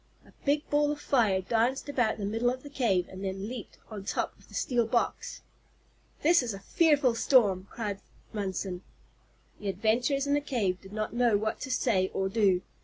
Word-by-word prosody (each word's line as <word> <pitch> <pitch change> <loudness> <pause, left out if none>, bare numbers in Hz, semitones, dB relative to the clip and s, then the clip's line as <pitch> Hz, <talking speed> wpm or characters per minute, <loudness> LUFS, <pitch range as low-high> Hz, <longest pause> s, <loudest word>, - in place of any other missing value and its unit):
A - - -19
big 290 +1 +1
ball 295 0 +3
of 295 - -4
fire 220 -11 +2
danced 235 +8 0
about 245 -6 +1
the 205 - -3
middle 225 +4 +1
of 255 +1 -4
the 285 - -10
cave 195 -10 +1
and 190 +1 -9
then 195 +1 -3
leaped 240 -2 -8
on 205 -2 -6
top - - -2
of - - -21
the - - -13
steel 240 -3 +1
box. 235 +1 -1 0.8
"This 335 +1 +5
is 235 -5 -3
a - - -8
fearful 285 - +3
storm," 205 -6 +3
cried 205 -4 -4 0.3
Munson. 190 -3 -3 0.8
The 205 - -3
adventurers 230 +8 +1
in 285 - +1
the 290 - +2
cave 215 -10 -1
did 195 - -13
not 215 +1 -3
know 240 -3 +3
what 215 +2 -2
to 270 - -5
say 190 -7 +2
or 190 0 0
do. 195 -3 +2
225 Hz, 190 wpm, -29 LUFS, 195-260 Hz, 0.8 s, This